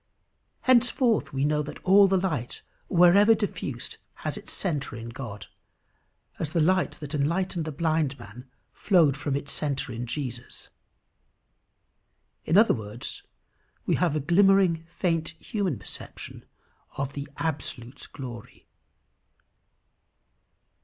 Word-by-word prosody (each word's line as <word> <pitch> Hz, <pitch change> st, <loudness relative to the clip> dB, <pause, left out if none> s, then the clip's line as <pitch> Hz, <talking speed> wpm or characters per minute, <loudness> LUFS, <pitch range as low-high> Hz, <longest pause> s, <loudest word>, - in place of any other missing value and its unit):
Henceforth 245 Hz, -2 st, +3 dB
we 135 Hz, +1 st, 0 dB
know 150 Hz, 0 st, +2 dB
that 150 Hz, -, -7 dB
all 195 Hz, +1 st, +7 dB
the 190 Hz, 0 st, +2 dB
light 155 Hz, -10 st, -2 dB, 0.2 s
wherever 190 Hz, +5 st, +6 dB
diffused 210 Hz, -2 st, -4 dB, 0.3 s
has -, -, -1 dB
its -, -, -9 dB
centre 150 Hz, -7 st, -3 dB
in 115 Hz, 0 st, -7 dB
God, 115 Hz, -5 st, -7 dB, 0.9 s
as 155 Hz, -1 st, -3 dB
the 170 Hz, -, +2 dB
light 185 Hz, +4 st, +2 dB
that 150 Hz, -1 st, -8 dB
enlightened 170 Hz, +3 st, 0 dB
the 155 Hz, -, -4 dB
blind 155 Hz, -2 st, 0 dB
man 120 Hz, +3 st, -12 dB, 0.2 s
flowed 165 Hz, -9 st, +3 dB
from 145 Hz, -1 st, -2 dB
its 140 Hz, 0 st, -3 dB
centre 140 Hz, -4 st, -2 dB
in 120 Hz, +2 st, -5 dB
Jesus. 125 Hz, -1 st, -6 dB, 1.8 s
In 165 Hz, -, +3 dB
other 220 Hz, +2 st, +6 dB
words, 110 Hz, +1 st, -6 dB, 0.6 s
we -, -, +1 dB
have 170 Hz, -4 st, +1 dB
a -, -, +1 dB
glimmering, 175 Hz, +1 st, +4 dB
faint, 165 Hz, -2 st, -1 dB
human 195 Hz, -, -2 dB
perception 100 Hz, -, -9 dB, 0.5 s
of 140 Hz, 0 st, -3 dB
the 140 Hz, 0 st, -5 dB
absolute 140 Hz, -5 st, -4 dB
glory. 120 Hz, -5 st, -9 dB
155 Hz, 120 wpm, -27 LUFS, 135-185 Hz, 1.8 s, all